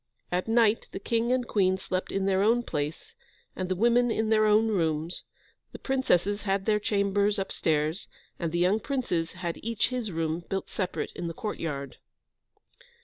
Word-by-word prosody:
At 180 +3 0
night 225 -1 +3
the - - -4
King 230 +3 0
and 255 -1 +1
Queen 190 -2 +2
slept 185 0 -3
in 195 0 0
their 195 -1 +2
own 230 +4 +3
place, 155 - -4 0.4
and 185 -1 -3
the 185 - +1
women 240 +4 +3
in 220 -1 0
their 215 -1 +4
own 215 +2 +4
rooms; 165 -3 -1 0.5
the - - -6
princesses 205 -7 +1
had 195 -1 -1
their 210 -1 +3
chambers 205 0 +1
upstairs, 160 -3 -1 0.3
and 170 -2 -2
the 170 - -1
young 185 +5 +3
princes 210 - -2
had 175 -2 -4
each 230 -1 0
his 245 -5 -3
room 165 0 -2
built 195 -1 -3
separate 185 -3 -3
in 175 - -4
the 165 - -5
courtyard. 150 -10 -4
195 Hz, 170 wpm, -28 LUFS, 175-220 Hz, 0.5 s, their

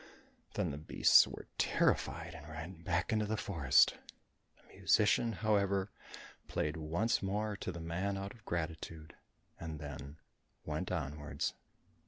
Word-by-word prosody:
Then - - 0
the 70 - -5
beasts 80 - +6
were - - -8
terrified - - +1
and 75 +1 -10
ran 80 +3 -7
back 85 +5 0
into 110 -1 +1
the 110 +1 -1
forest. 80 -12 +4 0.6
The - - -20
musician, 115 +2 +3
however, 100 -2 +1 0.6
played 75 +2 -1
once 85 +8 0
more 105 +2 -1
to 95 - -4
the 85 - -7
man 90 +5 -2
out 100 +1 -5
of 115 - -19
gratitude, 80 -2 -4 0.5
and 80 -2 -5
then 70 0 -7 0.5
went 80 +5 -3
onwards. 75 -3 -2
85 Hz, 135 wpm, -35 LUFS, 75-100 Hz, 0.6 s, beasts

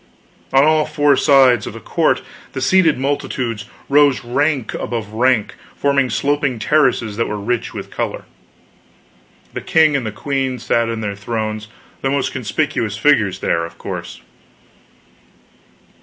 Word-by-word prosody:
On 135 +1 +5
all 155 0 +3
four 145 -2 +3
sides 130 -6 +4
of - - -6
the - - -8
court - - 0 0.3
the - - -3
seated 165 +2 +3
multitudes 130 -4 -2 0.2
rose 140 -2 +4
rank 140 +1 0
above 110 -3 -4
rank, 120 -1 +2 0.2
forming 140 -2 +1
sloping 145 -3 0
terraces 120 -4 +1
that 115 - 0
were 105 - -3
rich 115 +3 -2
with - - -7
color. - - -4 1.3
The - - -4
king 155 -2 +3
and 135 - 0
the 110 - -3
queen 135 +2 -2
sat 115 0 0
in 115 -1 -3
their 105 -2 -3
thrones, 110 0 -4 0.3
the 135 - 0
most 140 0 0
conspicuous 115 -3 -2
figures 110 -9 +2
there, 85 - 0
of 85 - -8
course. - - -7
130 Hz, 140 wpm, -18 LUFS, 110-145 Hz, 1.3 s, On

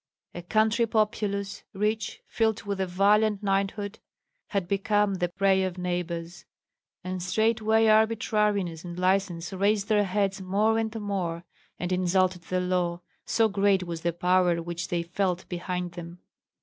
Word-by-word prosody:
A 175 - -6
country 220 +5 +2
populous, 210 -2 -1
rich, 210 +2 -2
filled 220 -1 0
with 200 -1 -3
a 190 - 0
valiant 205 +3 +3
knighthood, 200 +1 -1 0.5
had 195 -4 -2
become 205 +1 +1
the 180 -2 0
prey 190 +1 +2
of 185 -1 -3
neighbors; 175 -1 -4 0.6
and 185 0 -4
straightway 220 +3 +2
arbitrariness 210 -5 +2
and 175 -1 -7
license 185 -1 0
raised 200 +2 +1
their 210 -1 +3
heads 195 0 -1
more 210 +4 +2
and 225 0 -2
more, 185 -5 -3 0.3
and 180 0 -4
insulted 185 0 +1
the 185 - -1
law, 180 -1 -1 0.3
so 225 -1 +3
great 200 -2 +2
was 170 -2 -5
the 170 - 0
power 180 0 +2
which 170 +1 -4
they 170 -1 -1
felt 180 +1 -2
behind 180 0 -3
them. 170 0 -9
195 Hz, 145 wpm, -27 LUFS, 180-210 Hz, 0.6 s, valiant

